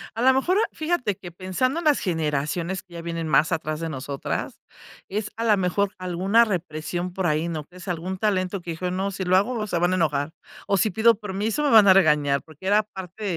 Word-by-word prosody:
A 225 - -3
la 260 +2 +6
mejor, 270 +9 +2
ah, 445 - +1
fíjate 310 - -1
que 175 - -10
pensando 190 - -1
en 340 - -7
las 300 -2 +4
generaciones 165 +2 -2
que 180 -2 -20
ya 170 - -6
vienen 165 -1 -4
más 155 +2 +3
atrás 155 -2 -2
de 165 0 -3
nosotras, 140 -1 -4 0.5
es 210 +1 -3
a 230 - -2
la 215 -3 +4
mejor 195 +2 +1
alguna 185 +5 +2
represión 175 -2 -3
por 190 0 -2
ahí, 155 0 +1
¿no?, 160 -3 -4
que 180 - -17
es 185 +2 -11
algún 180 +2 -3
talento 190 -2 0
que 170 - -6
dijo: 180 +2 -3
"No, 190 +2 -1
si 195 -1 -4
lo 185 0 +2
hago 215 +2 0
se 175 -5 -1
van 175 +1 +2
a - - +2
enojar", 150 -3 0 0.4
o, 195 - +2
"si 210 +3 +2
pido 230 +1 +4
permiso 210 +5 -2
me 290 - +2
van 220 -3 +8
a 190 - +9
regañar", 150 -6 +3
porque 160 +4 -10
era 210 +2 +4
parte 190 0 -9
185 Hz, 230 wpm, -24 LUFS, 165-210 Hz, 0.5 s, a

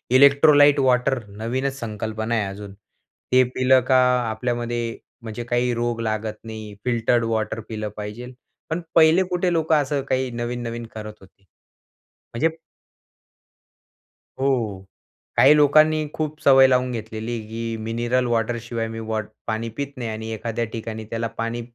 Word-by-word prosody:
Electrolyte 145 +1 +6
water, 130 0 +2
नवीनच 125 +7 -3
संकल्पना 110 0 -3
आहे 105 - +1
अजून, 100 0 -8 0.6
ते 130 0 +6
पिलं 130 0 +4
का, 130 -1 +5 0.3
आपल्यामध्ये, 120 0 -2 0.2
म्हणजे 115 +1 -6
काही 120 +1 0
रोग 120 0 -2
लागत 110 -1 -2
नाही. 110 -2 -8
फिल्टर्ड 120 0 +2
वॉटर 110 -1 -1
पिलं 110 -1 -4
पाहिजे. 105 +4 -6 0.4
पण 165 +2 -2
पहिले 165 +3 +6
कुठे 180 0 -1
लोकं 160 -1 +2
असं 140 0 -1
काही 130 0 0
नवीन-नवीन 120 0 -4
करत 110 -1 -7
होते, 95 0 -20 0.9
म्हणजे 160 +7 0 1.8
हो. 115 -8 -1 0.5
काही 140 +3 +8
लोकांनी 155 +1 +4
खूप 155 0 -3
सवय 135 -1 +7
लावून 125 -1 +2
घेतलेली 110 0 -5
आहे, 120 -2 -3
की 115 0 -4
मिनरल 120 +3 0
वॉटर 120 0 0
शिवाय 115 -1 -3
मी 115 0 -6
वॉट 110 -1 -3 0.2
पाणी 110 +1 -2
पित 140 -1 -5
नाही. 120 -2 -4
आणि 110 +1 -5
एखाद्या 115 +1 -3
ठिकाणी 110 -1 -5
त्याला 115 0 -2
पाणी 115 +1 -2
120 Hz, 140 wpm, -23 LUFS, 110-130 Hz, 1.8 s, काही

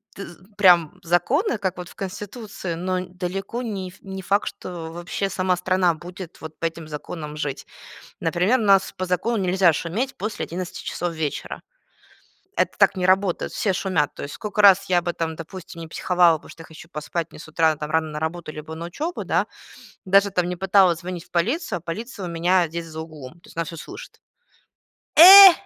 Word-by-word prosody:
ты 195 - -7
з 175 +2 -15
прям 175 -6 +5
законы, 225 - +1
как 190 -2 -3
вот 180 -1 -7
в - - -15
конституции, 200 -1 -6
но 185 +2 -1
далеко 185 +6 -4
не 195 -5 -4
не 190 -1 -7
факт, 200 +2 +1
что 165 -2 -7
вообще 175 +3 -3
сама 185 -1 0
страна 180 -1 +2
будет 175 +2 -10
вот 160 0 -9
по 165 - -2
этим 165 -1 -4
законам 150 0 -7
жить. 145 -3 -4 0.5
Например, 180 +9 +2
у - - -1
нас 195 -2 +4
по 185 - -2
закону 185 +6 0
нельзя 185 -2 +3
шуметь 210 - -2
после 210 +2 -3
11 180 +1 -6
часов 175 -1 -3
вечера. 155 -3 -4 1.0
Это - - 0
так - - +4
не 180 0 0
работает. 185 -1 +1
Все 195 - 0
шумят. 180 -6 0
То - - -8
есть 140 - -7
сколько 210 -1 -2
раз 195 0 +7
я 180 -1 +3
бы 175 0 -2
там, 160 -1 -3
допустим, 170 0 -9
не 165 - -6
психовала, 175 -1 +3
потому - - -17
что 165 - -12
я - - -13
хочу 160 +1 -13
поспать, 160 +1 -4
мне - - -13
с 155 - -10
утра 160 0 +2
там 150 0 -5
рано 160 -1 +1
на 150 - -5
работу 160 0 -4
либо 155 +1 -8
на 165 +1 -6
учебу, 310 - -4
да, - - +1 0.6
даже, 200 +2 +4
там, 180 -1 0
не 180 - -3
пыталась 190 -2 +4
звонить 175 -1 -6
в - - -31
полицию, 200 - 0
а - - -17
полиция 205 +4 -6
у 175 - -5
меня 175 +1 +2
здесь 170 +1 -5
за 160 0 -7
углом, 155 -3 -9
то 215 - -20
есть - - -13
она 165 - +1
все 165 +1 -8
слышит. 155 - -11 0.9
Э! 385 +3 +12
180 Hz, 200 wpm, -23 LUFS, 165-195 Hz, 1.0 s, Э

